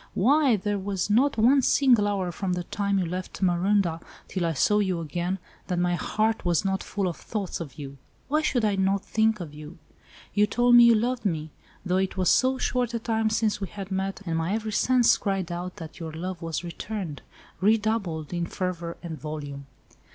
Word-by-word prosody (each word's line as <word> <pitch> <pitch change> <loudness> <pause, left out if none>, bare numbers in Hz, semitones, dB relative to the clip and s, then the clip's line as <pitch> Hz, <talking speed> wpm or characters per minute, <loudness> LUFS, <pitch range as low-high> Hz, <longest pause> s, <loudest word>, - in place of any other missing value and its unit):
"Why, 270 +4 +4
there 205 0 -2
was 195 0 -2
not 265 +6 +3
one 255 +5 +5
single 245 -6 +4
hour 190 -3 -1
from 185 +2 -2
the 180 0 -2
time 200 +2 -1
you 185 - +1
left 185 +3 -5
Marondah 180 -1 +2 0.3
till 180 -3 -1
I 165 - 0
saw 210 +9 +3
you 190 -4 0
again, 175 +3 -2 0.3
that 180 - -1
my 175 0 +1
heart 215 +5 0
was 175 +1 +1
not 190 0 0
full 200 -2 -2
of 170 - -3
thoughts 205 -4 -4
of 145 -6 -8
you. 140 -2 -8 0.3
Why 305 +2 +2
should 245 -7 +1
I 205 -2 +2
not 195 +1 +1
think 220 -1 +1
of 165 -5 -7
you? 150 +2 -10 0.6
You 210 0 +3
told 245 +3 +3
me 240 0 +9
you 235 -1 +7
loved 245 +3 0
me—though 175 +1 -3
it 190 0 -1
was 185 -1 +3
so 260 +1 +3
short 250 -2 -1
a - - 0
time 225 -1 0
since 215 -1 0
we 195 - -2
had 195 +1 -8
met, 195 +1 -2
and 165 -2 -1
my 170 +5 0
every 220 -1 -3
sense 250 +2 +4
cried 195 -4 -2
out 175 +1 -5
that 160 -2 -9
your 165 -2 -5
love 175 +2 -5
was 165 +1 -3
returned—redoubled 195 0 -2
in 170 -1 -1
fervour 170 -2 -4
and 160 -3 -6
volume." 145 -2 -6
190 Hz, 195 wpm, -26 LUFS, 170-220 Hz, 0.6 s, me